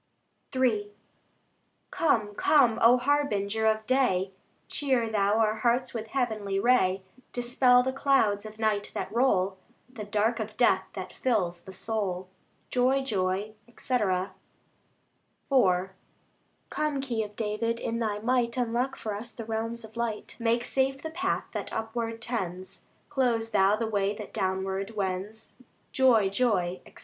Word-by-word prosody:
III 220 -6 +1 1.0
Come, 220 -10 +1
come, 240 -1 +4
O 240 +2 +7
Harbinger 225 -6 +1
of 220 0 +1
day! 205 -8 +2 0.4
Cheer 260 -5 0
Thou 205 0 +2
our 220 -1 +2
hearts 240 +3 +1
with 225 -2 -4
heavenly 215 -6 -1
ray, 195 -5 +3 0.3
Dispel 250 +1 +4
the 260 +1 -1
clouds 265 -8 +2
of 215 0 -10
night 215 -2 0
that - - -4
roll, 200 -6 +2 0.4
The 215 -5 -6
dark 215 +3 0
of 215 0 -5
death 215 -6 +3
that 185 -2 -7
fills 180 -9 -1
the 190 - -9
soul. 190 -3 -3 0.4
Joy, 260 +2 +2
joy, 200 -2 -1 0.2
&c. 255 - -5
IV 190 -5 +1 2.4
Come, 300 -2 -1
Key 245 -5 -2
of 210 0 -9
David! 230 +2 -1
in 230 0 -2
Thy 215 -3 -1
might 235 +2 0
Unlock 245 +2 0
for 215 - -4
us 225 +4 -6
the 230 - -8
realms 225 +1 -3
of 220 - -16
light; 235 -2 -3
Make 235 +1 +1
safe 270 0 0
the 320 - -4
path 365 +4 -2
that - - -4
upward 225 0 -3
tends, 185 -6 -5 0.2
Close 235 -4 0
Thou 200 -1 +4
the 225 +1 -2
way 205 -2 0
that 210 0 -9
downward 190 +1 -2
wends. 200 +2 -4 0.4
Joy, 245 -6 +4
joy, 195 -4 0
&c. - - -19
220 Hz, 140 wpm, -28 LUFS, 205-245 Hz, 2.4 s, O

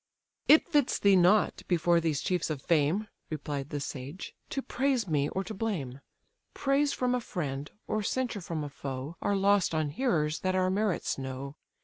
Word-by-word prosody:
"It 310 - +7
fits 295 -6 +2
thee 200 -1 +5
not, 185 +3 +4
before 170 -1 +3
these 155 -4 0
chiefs 180 -3 0
of 155 -3 -2
fame, 170 +6 +2 0.2
(Replied 145 -2 -4
the 145 - -3
sage,) 140 +5 -6 0.2
to 270 - -3
praise 260 -4 0
me, 150 -3 +1
or 190 - -2
to 195 - -6
blame: 180 - -3 0.6
Praise 280 +1 +2
from 250 -2 0
a 250 - 0
friend, 145 -9 -4 0.2
or 215 - -1
censure 235 -1 -1
from 165 -3 -3
a 145 - -5
foe, 135 +2 -6
Are 205 - +1
lost 195 -3 +3
on 155 -2 +1
hearers 155 - 0
that 185 0 0
our 185 0 +2
merits 200 -7 0
know. 135 +1 -5
175 Hz, 175 wpm, -29 LUFS, 145-215 Hz, 0.6 s, It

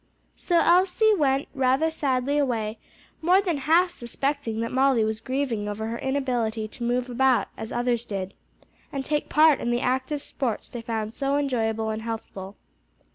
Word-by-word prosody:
So 345 - 0
Elsie 370 +6 +4
went 275 -6 +1
rather 265 +4 +2
sadly 280 -1 0
away, 225 -5 -1 0.4
more 360 +4 +5
than 360 -6 0
half 330 +6 +3
suspecting 250 -2 -3
that 230 - -3
Molly 260 -3 +3
was 220 0 -2
grieving 240 -4 -2
over 210 +1 -4
her 235 - -4
inability 245 -5 -1
to 240 - -8
move 245 +1 0
about 255 0 +2
as 220 - -7
others 240 -1 0
did, 195 -4 -5 0.6
and 270 -1 -4
take 295 -1 -1
part 310 -1 +5
in 240 - -2
the 240 0 +1
active 260 +3 -1
sports 240 -6 -3
they 240 - -6
found 225 -2 -3
so 275 +2 0
enjoyable 225 -6 0
and 220 0 -4
healthful. 215 -4 -6
255 Hz, 165 wpm, -25 LUFS, 225-285 Hz, 0.6 s, more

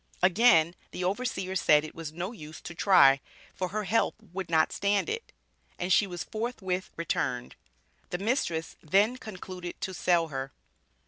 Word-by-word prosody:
Again 175 -4 +5 0.2
the 180 - -5
overseer 190 -1 -2
said 150 -4 +4
it 155 - -8
was 165 -2 -6
"no 175 +5 -4
use 155 -8 -10
to 170 - -8
try, 140 -7 +6 0.3
for 185 - -2
her 210 +4 -3
health 210 +4 +1 0.2
would 190 -2 -4
not 160 -1 +3
stand 200 0 +1
it," 455 +1 -4 0.5
and 180 +1 +1
she 205 - +4
was 175 -2 -5
forthwith 210 -5 -3
returned. 125 -7 -2 0.5
The - - -2
mistress 190 - -1
then 205 +10 +3
concluded 185 -5 -8
to 190 - -3
sell 170 -2 +2
her. 135 -1 -5
180 Hz, 155 wpm, -29 LUFS, 165-205 Hz, 0.5 s, try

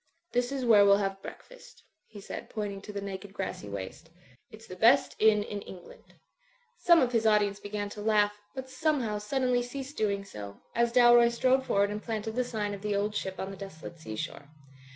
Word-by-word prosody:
*'This 245 +1 0
is 270 -2 -2
where 215 -4 +7
we'll 200 0 +6
have 195 -1 -2
breakfast," - - -12 0.2
he 210 - -12
said, 195 - -8
point 210 -2 -4
ing 195 - -9
to 210 - -9
the 200 -1 -5
naked 195 0 -7
grassy 190 - -5
waste. 100 - -7 0.4
"It's 220 +1 -13
the 185 - -9
best 235 +8 +4
inn 215 -1 +4
in 205 -1 -6
England.*' 180 -3 -13 0.6
Some 340 -1 +6
of 250 -2 +1
his 225 -2 +2
audience 205 -2 +2
began 205 0 -4
to 210 - -8
laugh, 210 -1 +2 0.2
but 265 0 -6
somehow 260 -6 -1
suddenly 250 +3 0
ceased 270 +3 -7
doing 200 -2 0
so, 100 - -9
as 235 0 +2
Dalroy 240 -1 +6
strode 260 +2 +1
forward 200 0 +2
and 210 0 -4
planted 220 -1 -4
the 250 - +1
sign 215 -4 -3
of 200 - -7
"The 210 0 -1
Old 205 +1 0
Ship" 190 -3 -4
on 190 - -4
the 195 - -9
deso 195 -5 -10
late 170 - -9
sea 110 -9 -7
shore. 140 +6 -6
210 Hz, 210 wpm, -29 LUFS, 200-240 Hz, 0.6 s, where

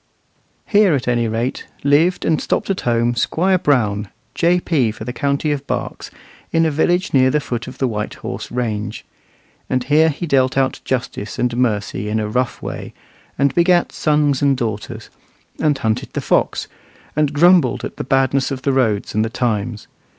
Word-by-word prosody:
Here, 205 -6 +4
at 130 - -3
any 120 -1 +1
rate, 115 +4 -3 0.2
lived 155 +6 +3
and 160 - +1
stopped - - -1
at 190 - -2
home 120 0 +1
Squire 180 +10 +1
Brown, 110 - +1 0.3
J.P. 170 -7 +2
for 110 - -9
the 125 +2 -5
county 140 +2 0
of 140 -1 -3
Berks, - - -4 0.4
in 165 0 +3
a 160 - +1
village 175 +6 +1
near 130 -1 +5
the 150 +3 +2
foot 120 -5 -4
of - - -9
the 130 - +1
White 105 -3 -3
Horse - - -6
range. 110 -3 -3 0.6
And 130 -1 0
here 155 +4 +4
he 160 +4 -4
dealt 135 -4 +2
out 135 -1 +1
justice 125 -5 -3
and 125 -1 0
mercy 105 -4 -1
in 110 +1 0
a 105 - -2
rough 125 +3 -2
way, - - -6 0.4
and 140 0 +2
begat 175 +1 +3
sons 150 -3 +1
and 140 -2 +3
daughters, 110 -4 -5 0.5
and 150 -3 +2
hunted 110 -3 -2
the - - -1
fox, - - 0 0.5
and 150 -1 +2
grumbled 165 -3 +4
at - - -8
the - - -3
badness 135 +1 +1
of 130 -2 -5
the 140 - +1
roads 110 -6 +1
and 110 - +2
the 110 - -2
times. 110 -2 -2
130 Hz, 180 wpm, -19 LUFS, 115-150 Hz, 0.6 s, near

